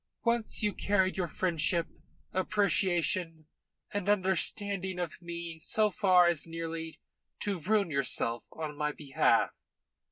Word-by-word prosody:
Once 235 Hz, -2 st, 0 dB
you 210 Hz, -1 st, +2 dB
carried 190 Hz, -2 st, +1 dB
your 180 Hz, -2 st, -1 dB
friendship, 170 Hz, 0 st, 0 dB, 0.5 s
appreciation, 180 Hz, -4 st, +1 dB, 0.5 s
and 205 Hz, -1 st, -1 dB
understanding 190 Hz, -1 st, +1 dB
of 175 Hz, -1 st, -4 dB
me 170 Hz, -1 st, -6 dB
so 215 Hz, +5 st, +2 dB
far 180 Hz, -2 st, +5 dB
as 170 Hz, -2 st, +1 dB
nearly 165 Hz, 0 st, -5 dB, 0.4 s
to 200 Hz, -3 st, -2 dB
ruin 200 Hz, +1 st, +1 dB
yourself 125 Hz, -4 st, +1 dB
on 155 Hz, -2 st, -5 dB
my 150 Hz, 0 st, -1 dB
behalf. 145 Hz, -2 st, +2 dB
175 Hz, 120 wpm, -31 LUFS, 160-195 Hz, 0.5 s, far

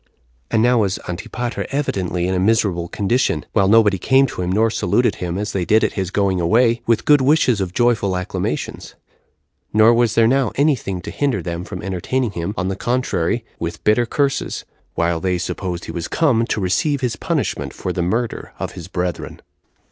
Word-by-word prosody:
And 110 Hz, -, +2 dB
now 125 Hz, 0 st, +4 dB
was 100 Hz, -3 st, +1 dB
Antipater 120 Hz, +7 st, -4 dB
evidently 95 Hz, -11 st, -1 dB
in 95 Hz, -, 0 dB
a 90 Hz, -, 0 dB
miserable 95 Hz, -4 st, +1 dB
condition, 100 Hz, -, 0 dB
while 100 Hz, -3 st, +3 dB
nobody 105 Hz, -2 st, +4 dB
came 135 Hz, +7 st, +4 dB
to 110 Hz, -, -5 dB
him 90 Hz, 0 st, -1 dB
nor 110 Hz, +3 st, +2 dB
saluted 110 Hz, +5 st, +1 dB
him, 90 Hz, 0 st, -3 dB
as 105 Hz, +1 st, -3 dB
they 95 Hz, -, -1 dB
did 110 Hz, +6 st, +3 dB
at -, -, +1 dB
his 95 Hz, -3 st, -2 dB
going 95 Hz, -3 st, 0 dB
away, 115 Hz, +6 st, +3 dB
with 115 Hz, -2 st, +2 dB
good 145 Hz, -2 st, +5 dB
wishes 130 Hz, -6 st, +3 dB
of 95 Hz, -2 st, -2 dB
joyful 105 Hz, -4 st, +1 dB
acclamations; 90 Hz, -, -4 dB, 0.8 s
nor 110 Hz, +2 st, +6 dB
was 120 Hz, -1 st, +2 dB
there 115 Hz, -, +5 dB
now 135 Hz, +2 st, +2 dB
any 145 Hz, +1 st, +3 dB
thing 95 Hz, -6 st, -5 dB
to -, -, -7 dB
hinder 135 Hz, -, -1 dB
them 85 Hz, -1 st, -4 dB
from 90 Hz, -2 st, -7 dB
entertaining 100 Hz, +6 st, -1 dB
him, 85 Hz, +3 st, -4 dB
on 90 Hz, -, -1 dB
the 95 Hz, -, -2 dB
contrary, 120 Hz, -2 st, -1 dB
with 85 Hz, 0 st, -5 dB
bitter 110 Hz, +3 st, +3 dB
curses, 140 Hz, +3 st, -1 dB, 0.3 s
while 85 Hz, 0 st, 0 dB
they 90 Hz, 0 st, 0 dB
supposed 90 Hz, 0 st, -4 dB
he -, -, -6 dB
was 85 Hz, -, -4 dB
come 125 Hz, -8 st, +2 dB
to 110 Hz, -, -1 dB
receive 130 Hz, -, 0 dB
his 120 Hz, -4 st, -1 dB
punishment -, -, -2 dB
for 90 Hz, -, -4 dB
the 90 Hz, -, -2 dB
murder 110 Hz, +7 st, -2 dB
of -, -, -4 dB
his 85 Hz, -, -9 dB
brethren. 90 Hz, -3 st, -4 dB
105 Hz, 195 wpm, -20 LUFS, 90-120 Hz, 0.8 s, nor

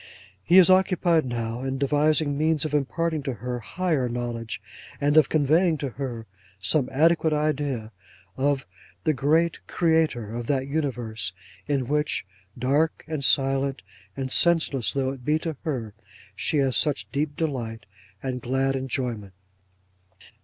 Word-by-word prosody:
He 175 Hz, -, +5 dB
is 185 Hz, 0 st, +8 dB
occupied 180 Hz, -5 st, +3 dB
now, 115 Hz, 0 st, -3 dB
in 135 Hz, 0 st, -2 dB
devising 145 Hz, +1 st, +2 dB
means 155 Hz, +1 st, +2 dB
of 150 Hz, -, -4 dB
imparting 155 Hz, +2 st, 0 dB
to 135 Hz, -3 st, -4 dB
her, 120 Hz, +3 st, -4 dB
higher 150 Hz, -, -1 dB
knowledge; 120 Hz, -1 st, -4 dB, 0.4 s
and 145 Hz, +1 st, +2 dB
of 155 Hz, -, +6 dB
conveying 160 Hz, +3 st, +3 dB
to 140 Hz, -2 st, -3 dB
her 120 Hz, -2 st, -5 dB, 0.3 s
some 130 Hz, +6 st, +1 dB
adequate 160 Hz, +3 st, +3 dB
idea 145 Hz, -7 st, -1 dB, 0.4 s
of 140 Hz, -2 st, 0 dB, 0.4 s
the 155 Hz, -, +2 dB
Great 155 Hz, +5 st, +2 dB
Creator 160 Hz, -10 st, +1 dB
of 120 Hz, -1 st, -5 dB
that 135 Hz, -2 st, 0 dB
universe 120 Hz, -, -2 dB, 0.3 s
in 140 Hz, -4 st, 0 dB
which, 150 Hz, -4 st, 0 dB, 0.3 s
dark 140 Hz, +6 st, 0 dB
and 155 Hz, -3 st, -3 dB
silent 135 Hz, -3 st, +3 dB, 0.3 s
and 130 Hz, -1 st, -3 dB
scentless 150 Hz, -, +3 dB
though 135 Hz, -1 st, -1 dB
it 135 Hz, -2 st, -9 dB
be 150 Hz, +4 st, +2 dB
to 160 Hz, -1 st, -4 dB
her, 120 Hz, -9 st, -3 dB, 0.4 s
she 155 Hz, -, 0 dB
has 135 Hz, -3 st, +2 dB
such 150 Hz, -3 st, +1 dB
deep 145 Hz, +1 st, -2 dB
delight 120 Hz, -8 st, -3 dB, 0.4 s
and 130 Hz, -2 st, -3 dB
glad 135 Hz, +2 st, 0 dB
enjoyment. 125 Hz, -6 st, -3 dB
140 Hz, 140 wpm, -25 LUFS, 125-155 Hz, 0.4 s, is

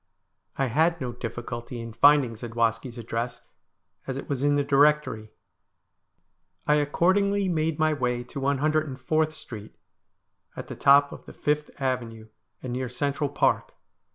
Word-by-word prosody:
I 135 Hz, -, +1 dB
had 160 Hz, +7 st, +2 dB
no 125 Hz, -2 st, -3 dB
difficulty 120 Hz, 0 st, -6 dB
in 115 Hz, -1 st, -7 dB
finding 140 Hz, 0 st, +5 dB
Zadwaski's 115 Hz, +1 st, -2 dB
address, 115 Hz, +1 st, -4 dB, 0.7 s
as 135 Hz, -1 st, -3 dB
it -, -, -7 dB
was 140 Hz, -3 st, -2 dB
in 145 Hz, 0 st, +3 dB
the 145 Hz, -, +2 dB
directory. 140 Hz, -6 st, +2 dB, 1.4 s
I 150 Hz, -, +3 dB
accordingly 190 Hz, +7 st, +2 dB
made 160 Hz, -3 st, 0 dB
my 155 Hz, -1 st, +2 dB
way 125 Hz, -3 st, -1 dB
to 125 Hz, +3 st, -8 dB
104th 150 Hz, +2 st, 0 dB
Street, 110 Hz, -8 st, -9 dB, 0.8 s
at -, -, -8 dB
the -, -, -6 dB
top 140 Hz, +1 st, +5 dB
of -, -, -11 dB
the -, -, -10 dB
5th 150 Hz, 0 st, -1 dB
Avenue, 120 Hz, -5 st, -3 dB, 0.3 s
and 125 Hz, -2 st, -4 dB
near 130 Hz, 0 st, -3 dB
Central 140 Hz, +3 st, -1 dB
Park. 145 Hz, -, +1 dB
135 Hz, 140 wpm, -26 LUFS, 120-150 Hz, 1.4 s, finding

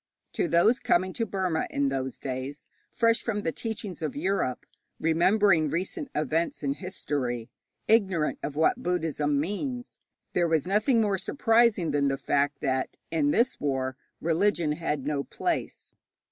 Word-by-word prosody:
To -, -, 0 dB
those 175 Hz, +10 st, +4 dB
coming 185 Hz, -7 st, +1 dB
to 230 Hz, -2 st, -2 dB
Burma 185 Hz, -4 st, -1 dB
in 140 Hz, -1 st, +1 dB
those 130 Hz, -1 st, -3 dB
days, 135 Hz, +2 st, -5 dB, 0.2 s
fresh 230 Hz, -1 st, +2 dB
from 210 Hz, -3 st, -2 dB
the 165 Hz, -, 0 dB
teachings 210 Hz, -3 st, -5 dB
of 155 Hz, -3 st, -3 dB
Europe, 165 Hz, -5 st, -1 dB, 0.3 s
remembering 170 Hz, 0 st, +3 dB
recent 185 Hz, -, -3 dB
events 155 Hz, +2 st, -1 dB
in 140 Hz, -1 st, +1 dB
history, 140 Hz, -9 st, -3 dB, 0.4 s
ignorant 190 Hz, -8 st, +2 dB
of 145 Hz, -, -4 dB
what 160 Hz, +1 st, +2 dB
Buddhism 155 Hz, -5 st, 0 dB
means, 245 Hz, -, -4 dB, 0.3 s
there 175 Hz, -1 st, +2 dB
was 160 Hz, -3 st, +1 dB
nothing 215 Hz, +5 st, +3 dB
more 200 Hz, -3 st, +1 dB
surprising 225 Hz, -, +3 dB
than 140 Hz, -1 st, +2 dB
the 135 Hz, 0 st, 0 dB
fact 140 Hz, 0 st, 0 dB
that 130 Hz, 0 st, -1 dB
in 155 Hz, -3 st, +2 dB
this 235 Hz, -, +2 dB
war 130 Hz, -2 st, -1 dB, 0.2 s
religion 170 Hz, -1 st, +1 dB
had 150 Hz, -3 st, -2 dB
no 145 Hz, -1 st, -1 dB
place. -, -, -3 dB
165 Hz, 145 wpm, -27 LUFS, 145-205 Hz, 0.4 s, those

